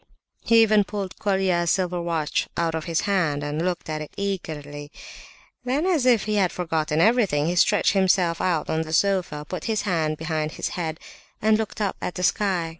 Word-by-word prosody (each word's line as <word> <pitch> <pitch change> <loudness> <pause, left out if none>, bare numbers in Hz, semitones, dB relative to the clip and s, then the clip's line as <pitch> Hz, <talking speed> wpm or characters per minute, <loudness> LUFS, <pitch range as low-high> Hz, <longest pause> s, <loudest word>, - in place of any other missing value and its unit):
He 230 0 +6
even 215 -1 +4
pulled 195 -2 -6
Colia's 190 -4 +1
silver 180 -1 0
watch 165 -3 -1
out 165 -1 0
of 160 -1 -3
his 165 -2 0
hand, 165 -8 0
and 150 +2 -2
looked 180 -1 -2
at 155 -1 -3
it 155 - -7
eagerly. 150 -7 -5 0.7
Then, 270 +6 0
as 325 -9 +2
if 235 -4 +4
he 210 0 -1
had 185 -3 +2
forgotten 160 -3 -1
everything, 200 -7 +3
he 175 +2 0
stretched 205 +4 +3
himself 185 -3 +2
out 175 -4 0
on 160 - 0
the 160 0 -5
sofa, 180 -6 +1
put 185 - -5
his 220 -2 -1
hands 160 -6 0
behind 155 -1 -2
his - - -3
head, 160 -2 -4 0.4
and 215 +1 +3
looked 215 0 -3
up 200 - -1
at 180 - -4
the 180 - -4
sky. 185 -4 +1
180 Hz, 190 wpm, -24 LUFS, 160-200 Hz, 0.7 s, He